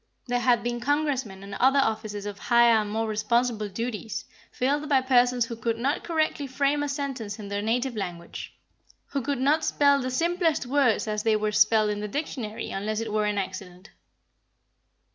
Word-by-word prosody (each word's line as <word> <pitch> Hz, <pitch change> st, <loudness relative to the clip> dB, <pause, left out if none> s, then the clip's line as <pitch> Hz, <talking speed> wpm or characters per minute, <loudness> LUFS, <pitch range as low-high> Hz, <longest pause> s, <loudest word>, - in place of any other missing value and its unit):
There 245 Hz, -1 st, 0 dB
had 245 Hz, -1 st, +3 dB
been 240 Hz, 0 st, -2 dB
congressmen 265 Hz, -7 st, -1 dB
and 200 Hz, 0 st, -9 dB
other 265 Hz, +7 st, +3 dB
offices 215 Hz, -5 st, -1 dB
of 205 Hz, -1 st, -6 dB
higher 235 Hz, -1 st, +5 dB
and 210 Hz, -, -5 dB
more 220 Hz, +2 st, -1 dB
responsible 215 Hz, 0 st, 0 dB
duties, 225 Hz, +1 st, -4 dB, 0.3 s
filled 290 Hz, +4 st, -1 dB
by 270 Hz, -2 st, +4 dB
persons 250 Hz, -2 st, +3 dB
who 230 Hz, -, -6 dB
could 230 Hz, 0 st, -2 dB
not 270 Hz, +5 st, -1 dB
correctly 310 Hz, -3 st, -1 dB
frame 280 Hz, +2 st, +1 dB
a 290 Hz, -, -1 dB
sentence 270 Hz, -8 st, -4 dB
in 205 Hz, -2 st, -8 dB
their 200 Hz, 0 st, -2 dB
native 240 Hz, +3 st, -1 dB
language, 175 Hz, -4 st, -6 dB, 0.6 s
who 280 Hz, -, -2 dB
could 280 Hz, +1 st, -2 dB
not 295 Hz, +4 st, +2 dB
spell 280 Hz, -2 st, +3 dB
the 255 Hz, -, -2 dB
simplest 335 Hz, +2 st, +1 dB
words 250 Hz, -4 st, +2 dB
as 210 Hz, 0 st, -1 dB
they 220 Hz, 0 st, +2 dB
were 215 Hz, 0 st, 0 dB
spelled 215 Hz, 0 st, +4 dB
in 205 Hz, -, -3 dB
the 210 Hz, -, -3 dB
dictionary, 230 Hz, -3 st, -4 dB
unless 210 Hz, +2 st, -2 dB
it 225 Hz, -2 st, -4 dB
were 215 Hz, -1 st, +1 dB
an 210 Hz, 0 st, -1 dB
accident. 190 Hz, -1 st, -6 dB
235 Hz, 180 wpm, -26 LUFS, 210-275 Hz, 0.6 s, higher